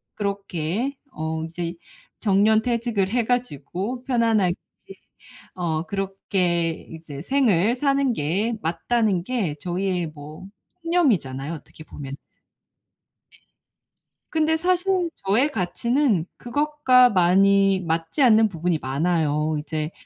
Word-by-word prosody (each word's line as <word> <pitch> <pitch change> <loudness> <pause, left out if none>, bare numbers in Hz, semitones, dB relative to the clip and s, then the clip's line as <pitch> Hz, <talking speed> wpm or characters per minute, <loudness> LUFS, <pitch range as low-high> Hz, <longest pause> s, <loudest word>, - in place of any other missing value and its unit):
그렇게 200 - -3
어 160 -2 -3
이제 170 +1 -5 0.5
정년퇴직을 220 0 +2
해 240 -1 +2
가지고 245 - -2
편안하게 225 -8 +2 1.0
어 165 -3 -2
그렇게 190 -3 0 0.2
이제 160 -3 -8
생을 230 -4 +2
사는 275 -1 +2
게 195 +10 -1
맞다는 185 +3 0
게 210 -12 -1
저희의 180 -1 -2
뭐 155 +4 -11 0.4
신념이잖아요, 175 - +1
어떻게 155 0 -12
보면은. 140 -2 -8
네. - - -45 2.1
근데 320 0 +1
사실 360 0 +1 0.2
저의 235 +10 +3
가치는 225 - 0
그것과 260 -1 +3
많이 195 +1 +4
맞지 165 - -2
않는 220 -3 +5
부분이 170 -2 -1
많아요. 150 +2 0
이제 155 +1 -4
195 Hz, 230 characters per minute, -23 LUFS, 165-240 Hz, 2.1 s, 않는